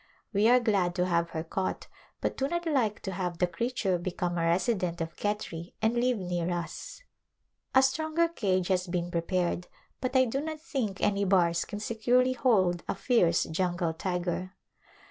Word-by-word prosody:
We 205 Hz, +2 st, +4 dB
are 250 Hz, +1 st, +7 dB
glad 195 Hz, -7 st, +1 dB
to 180 Hz, -, +1 dB
have 170 Hz, -2 st, +1 dB
her 160 Hz, -, -4 dB
caught 185 Hz, +3 st, -3 dB, 0.4 s
but -, -, -1 dB
do 270 Hz, -, 0 dB
not 345 Hz, +2 st, -2 dB
like 250 Hz, -10 st, +1 dB
to 195 Hz, -, -4 dB
have 180 Hz, -2 st, -3 dB
the 180 Hz, -, +3 dB
creature 190 Hz, 0 st, -1 dB
become 175 Hz, 0 st, -2 dB
a 165 Hz, -1 st, 0 dB
resident 180 Hz, 0 st, +1 dB
of 165 Hz, 0 st, -4 dB
Khetri, 195 Hz, -5 st, -4 dB
and 220 Hz, +1 st, +2 dB
live 245 Hz, 0 st, +2 dB
near 175 Hz, -2 st, -2 dB
us. 175 Hz, -, -5 dB, 0.7 s
A 265 Hz, -, +7 dB
stronger 315 Hz, +5 st, +2 dB
cage 190 Hz, -, 0 dB
has 185 Hz, -1 st, +1 dB
been 175 Hz, 0 st, -2 dB
prepared, 175 Hz, +1 st, -1 dB, 0.3 s
but 255 Hz, 0 st, -3 dB
I 260 Hz, 0 st, +6 dB
do 265 Hz, +4 st, -1 dB
not 310 Hz, 0 st, -5 dB
think 250 Hz, -11 st, -3 dB
any 200 Hz, 0 st, +2 dB
bars 175 Hz, -3 st, +3 dB
can 205 Hz, -, -6 dB
securely 245 Hz, +4 st, +2 dB
hold 190 Hz, -9 st, +2 dB
a -, -, -1 dB
fierce 180 Hz, -10 st, +3 dB
jungle 175 Hz, 0 st, -1 dB
tiger. 180 Hz, +2 st, -3 dB
190 Hz, 175 wpm, -29 LUFS, 175-240 Hz, 0.7 s, are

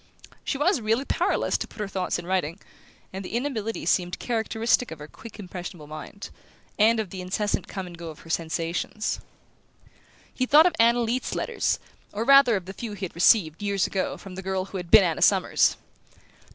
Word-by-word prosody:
She 275 Hz, -, -2 dB
was 295 Hz, -, +2 dB
really 225 Hz, +5 st, +1 dB
powerless -, -, 0 dB
to -, -, -4 dB
put -, -, -16 dB
her 210 Hz, -, -2 dB
thoughts 190 Hz, -2 st, -2 dB
in -, -, -7 dB
writing, 180 Hz, -1 st, -1 dB, 0.5 s
and 190 Hz, +1 st, -5 dB
the 190 Hz, -, -6 dB
inability 235 Hz, -4 st, -2 dB
seemed 180 Hz, -1 st, +1 dB
characteristic 230 Hz, +1 st, 0 dB
of 160 Hz, -, -8 dB
her 150 Hz, 0 st, -10 dB
quick 225 Hz, +7 st, -12 dB
impressionable 180 Hz, -4 st, -8 dB
mind, 155 Hz, +7 st, -9 dB, 0.5 s
and 225 Hz, +2 st, +5 dB
of 210 Hz, -5 st, -3 dB
the 185 Hz, -, -6 dB
incessant 200 Hz, +3 st, -2 dB
come 190 Hz, -2 st, -5 dB
and 175 Hz, -1 st, -10 dB
go 170 Hz, 0 st, -8 dB
of 155 Hz, -, -11 dB
her 165 Hz, -, -15 dB
sensations. 165 Hz, +6 st, -2 dB, 1.1 s
He 255 Hz, -, -1 dB
thought 305 Hz, +4 st, +7 dB
of 360 Hz, -, +3 dB
Anna 235 Hz, +1 st, +5 dB
Leath's 235 Hz, +3 st, -1 dB
letters, -, -, 0 dB, 0.4 s
or 210 Hz, +2 st, -2 dB
rather 275 Hz, -2 st, +6 dB
of 190 Hz, -3 st, -3 dB
the 190 Hz, -, -7 dB
few 220 Hz, 0 st, -6 dB
he 195 Hz, -1 st, -4 dB
had 175 Hz, -, -9 dB
received, 170 Hz, -2 st, +4 dB
years 200 Hz, -2 st, +1 dB
ago, 190 Hz, -, -2 dB
from 195 Hz, -, -11 dB
the 190 Hz, -, -6 dB
girl 190 Hz, 0 st, -2 dB
who 195 Hz, -, -7 dB
had 175 Hz, -2 st, -6 dB
been 220 Hz, 0 st, +8 dB
Anna 165 Hz, -4 st, -1 dB
Summers. -, -, +4 dB
195 Hz, 195 wpm, -25 LUFS, 180-230 Hz, 1.1 s, been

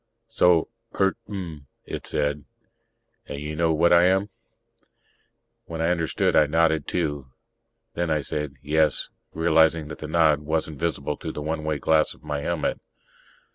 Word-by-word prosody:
"So. 85 Hz, -2 st, +3 dB, 0.3 s
Eert 95 Hz, -1 st, +3 dB
mn," 85 Hz, -8 st, -7 dB, 0.2 s
it -, -, -6 dB
said. 75 Hz, 0 st, -1 dB, 0.8 s
"And 70 Hz, -, -6 dB
you 75 Hz, +1 st, -5 dB
know 80 Hz, +1 st, +2 dB
what 85 Hz, +2 st, +4 dB
I 85 Hz, +1 st, +6 dB
am?" 95 Hz, +2 st, +2 dB, 1.3 s
When 80 Hz, -1 st, -6 dB
I 80 Hz, +1 st, +1 dB
understood, 85 Hz, -3 st, 0 dB
I 75 Hz, -, +5 dB
nodded, 80 Hz, -1 st, +2 dB
too. 75 Hz, -6 st, -2 dB, 0.7 s
Then 85 Hz, -4 st, -1 dB
I 75 Hz, -1 st, +1 dB
said, 75 Hz, 0 st, -4 dB
"Yes," 75 Hz, -1 st, +1 dB, 0.3 s
realizing 80 Hz, -1 st, +3 dB
that -, -, -8 dB
the 75 Hz, -, -6 dB
nod 80 Hz, -2 st, +3 dB
wasn't 80 Hz, 0 st, -2 dB
visible 75 Hz, -3 st, -2 dB
through -, -, -6 dB
the 75 Hz, -, -5 dB
one 80 Hz, 0 st, -3 dB
way 80 Hz, -1 st, -1 dB
glass 80 Hz, +1 st, +2 dB
of -, -, -24 dB
my 75 Hz, -1 st, -3 dB
helmet. 70 Hz, -, -2 dB
80 Hz, 155 wpm, -25 LUFS, 75-85 Hz, 1.3 s, I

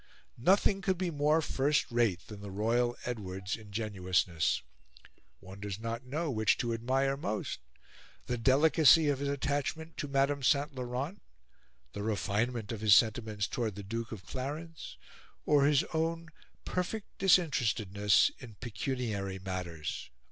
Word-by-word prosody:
Nothing 195 Hz, -, +3 dB
could 190 Hz, -2 st, 0 dB
be 180 Hz, -1 st, -1 dB
more 150 Hz, +2 st, +2 dB
first 145 Hz, 0 st, +1 dB
rate 115 Hz, -7 st, +1 dB
than 105 Hz, -2 st, -10 dB
the 100 Hz, -, -7 dB
royal 115 Hz, +5 st, +1 dB
Edward's 95 Hz, -5 st, -4 dB
ingenuousness. 100 Hz, -6 st, -1 dB, 0.8 s
One 95 Hz, +2 st, -11 dB
does 100 Hz, 0 st, -5 dB
not 115 Hz, +2 st, -5 dB
know 155 Hz, +4 st, -2 dB
which 110 Hz, -3 st, +2 dB
to 120 Hz, -1 st, -1 dB
admire 135 Hz, +4 st, +1 dB
most 110 Hz, -, -3 dB, 0.7 s
the 125 Hz, -, -1 dB
delicacy 145 Hz, +4 st, +5 dB
of 140 Hz, -2 st, 0 dB
his 140 Hz, 0 st, -1 dB
attachment 145 Hz, +3 st, -2 dB
to 145 Hz, -, -3 dB
Madame 140 Hz, +1 st, +1 dB
St. 140 Hz, +2 st, +2 dB
Laurent, 130 Hz, +7 st, -4 dB, 0.7 s
the 105 Hz, -, -5 dB
refinement 110 Hz, +2 st, -1 dB
of 110 Hz, -2 st, -5 dB
his 105 Hz, -2 st, +7 dB
sentiments 110 Hz, -3 st, +2 dB
towards 110 Hz, -3 st, -2 dB
the 100 Hz, -, -7 dB
Duke 115 Hz, +3 st, -4 dB
of 105 Hz, -4 st, -8 dB
Clarence, 150 Hz, +5 st, -6 dB, 0.5 s
or 145 Hz, -2 st, +4 dB
his 145 Hz, -2 st, +4 dB
own 165 Hz, +1 st, -1 dB, 0.4 s
perfect 185 Hz, +4 st, -4 dB
disinterestedness 110 Hz, -, +3 dB
in 115 Hz, -5 st, -11 dB
pecuniary 110 Hz, -4 st, -3 dB
matters." 90 Hz, -7 st, -5 dB
120 Hz, 135 wpm, -31 LUFS, 105-145 Hz, 0.8 s, his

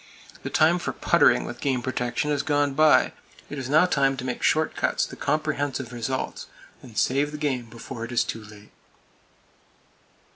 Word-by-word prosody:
The -, -, -5 dB
time 165 Hz, +3 st, +3 dB
for -, -, -3 dB
puttering -, -, +3 dB
with -, -, -8 dB
game 130 Hz, -3 st, 0 dB
protection 125 Hz, +3 st, -1 dB
has 145 Hz, -, +1 dB
gone 145 Hz, -2 st, +1 dB
by. 155 Hz, +2 st, +4 dB, 0.4 s
It 145 Hz, -, -4 dB
is 130 Hz, -1 st, -5 dB
now 155 Hz, +5 st, +5 dB
time 135 Hz, -6 st, +1 dB
to 130 Hz, -, -5 dB
make 125 Hz, -1 st, -3 dB
short 155 Hz, 0 st, +2 dB
cuts -, -, 0 dB
to -, -, -10 dB
comprehensive 145 Hz, -4 st, -2 dB
results, 120 Hz, +2 st, -4 dB, 0.3 s
and 115 Hz, -4 st, -13 dB
save 140 Hz, +3 st, +1 dB
the 150 Hz, -, -6 dB
game 135 Hz, -5 st, -1 dB
before 115 Hz, 0 st, -8 dB
it 115 Hz, -, -6 dB
is 120 Hz, -, +2 dB
too 115 Hz, -, -6 dB
late. 105 Hz, 0 st, -15 dB
135 Hz, 175 wpm, -25 LUFS, 120-150 Hz, 0.4 s, now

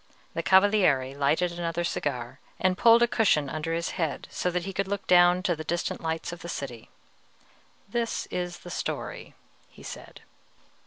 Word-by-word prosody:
The -, -, -1 dB
Cavaliere 190 Hz, -10 st, +4 dB
lighted 150 Hz, +5 st, +1 dB
another 170 Hz, 0 st, -2 dB
cigar, 130 Hz, -6 st, -3 dB, 0.2 s
and 185 Hz, 0 st, +2 dB
pulled 230 Hz, +3 st, +6 dB
a -, -, +4 dB
cushion 155 Hz, -, +2 dB
under 155 Hz, +1 st, -3 dB
his 170 Hz, 0 st, -1 dB
head 160 Hz, -3 st, -2 dB
so 180 Hz, -, -1 dB
that 180 Hz, 0 st, -2 dB
he 195 Hz, -, -5 dB
could 195 Hz, +1 st, -1 dB
look 200 Hz, 0 st, -3 dB
down 180 Hz, 0 st, +5 dB
to 180 Hz, -4 st, +1 dB
the 155 Hz, -, -6 dB
distant 170 Hz, +2 st, -2 dB
lights 160 Hz, 0 st, -3 dB
of 175 Hz, -, -8 dB
the 170 Hz, -, -8 dB
city. 125 Hz, -8 st, -6 dB, 1.0 s
"This 230 Hz, +2 st, -2 dB
is 175 Hz, -1 st, -4 dB
the 175 Hz, -, -7 dB
story," -, -, -5 dB, 0.3 s
he -, -, -16 dB
said. -, -, -9 dB
175 Hz, 170 wpm, -27 LUFS, 155-190 Hz, 1.0 s, pulled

